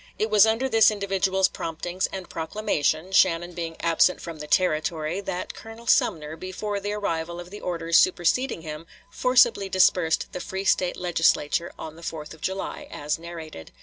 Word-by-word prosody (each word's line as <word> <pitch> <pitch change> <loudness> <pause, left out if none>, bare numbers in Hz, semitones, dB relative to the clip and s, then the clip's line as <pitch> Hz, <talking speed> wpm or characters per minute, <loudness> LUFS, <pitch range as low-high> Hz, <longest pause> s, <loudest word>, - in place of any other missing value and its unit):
It 215 0 -1
was 210 0 +7
under 225 +4 +1
this 225 -4 +5
individual's 195 -2 +1
promptings 175 +2 -3
and 190 -2 -7
proclamation, 160 -1 -1
Shannon 175 -2 +3
being 165 -1 -5
absent 170 +2 +3
from 165 -2 -8
the 150 - -7
Territory, 160 +1 0
that 190 -2 -4
Colonel 225 +1 -11
Sumner, 155 -8 +2
before 200 +4 -4
the 205 +1 -3
arrival 170 -4 -3
of 175 +1 -10
the 205 - -9
orders 165 -2 +2
superseding 185 +3 +1
him, 155 +1 -7 0.2
forcibly 245 -6 +3
dispersed 180 -3 +3
the - - -5
free 190 +1 -5
State 180 -2 +2
Legislature 170 -2 +1
on 160 0 -8
the - - -12
4th 155 -2 -6
of 160 - -16
July, 190 +1 -4
as 150 +2 -3
narrated. 165 - -9
180 Hz, 165 wpm, -25 LUFS, 165-195 Hz, 0.2 s, was